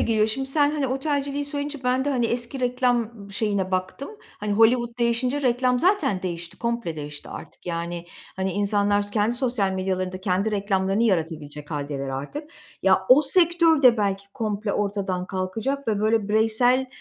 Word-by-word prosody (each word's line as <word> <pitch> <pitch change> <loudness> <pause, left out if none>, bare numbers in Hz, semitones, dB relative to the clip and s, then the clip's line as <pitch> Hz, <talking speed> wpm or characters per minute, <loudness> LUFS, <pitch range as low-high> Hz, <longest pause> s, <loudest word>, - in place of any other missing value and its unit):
geliyor. 220 -2 +2
Şimdi 265 +5 -2
sen, 290 +1 +3
hani, 295 -3 -1
otelciliği 280 +1 -1
söyleyince 285 +1 -4
ben 255 +2 +1
de, 290 - 0
hani, 245 -4 +1
eski 240 +3 -3
reklam 245 -4 0
şeyine 200 -3 -1
baktım. 185 +9 -3 0.3
Hani, 210 0 -2
Hollywood 235 +2 +3
değişince 250 +4 +1
reklam 250 0 +2
zaten 360 - +1
değişti, 175 -2 -5
komple 235 -8 -2
değişti 145 -1 -7
artık. - - -11
Yani, 170 0 -4 0.3
hani, 190 0 -1
insanlar 205 +1 +1
kendi 220 +2 +1
sosyal 240 -7 +1
medyalarında 185 0 -2
kendi 190 +3 0
reklamlarını 195 0 0
yaratabilecek 160 -7 -1
hâldeler 145 -2 -4
artık. 145 - -6 0.3
Ya 190 0 +5
o 265 +4 +7
sektör 335 0 +4
de 245 -2 +7
belki 200 -2 -1
komple 215 -3 -2
ortadan 195 -3 -2
kalkacak 220 +9 -3
ve, 210 -2 0
böyle, 215 -1 +1
bireysel, 225 +4 +3
220 Hz, 155 wpm, -24 LUFS, 190-255 Hz, 0.3 s, o